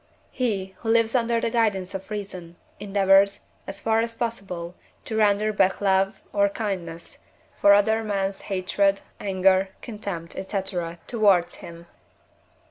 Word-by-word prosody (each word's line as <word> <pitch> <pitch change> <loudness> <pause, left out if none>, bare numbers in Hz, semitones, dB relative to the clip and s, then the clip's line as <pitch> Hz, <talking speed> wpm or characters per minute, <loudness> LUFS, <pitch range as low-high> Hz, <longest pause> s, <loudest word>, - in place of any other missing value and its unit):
He, 200 -7 -2
who 225 - -4
lives 230 0 +3
under 235 -2 +2
the 230 - -1
guidance 210 -6 0
of 190 +1 -7
reason, 185 -5 -7 0.2
endeavours, 195 0 +3 0.3
as 195 0 -6
far 225 0 +1
as 230 0 -2
possible, 195 -8 -4 0.3
to 220 - -4
render 215 0 +2
back 190 -2 +2
love, 195 0 +1
or 200 0 +3
kindness, 185 -6 -5 0.4
for 200 - +7
other 220 +2 +2
men's 195 -2 -2
hatred, 195 +1 +1 0.2
anger, 190 -1 +2
contempt, 200 -7 -6
&c., 195 0 -2 0.4
towards 200 -7 +3
him. 170 0 -11
200 Hz, 130 wpm, -24 LUFS, 190-220 Hz, 0.4 s, for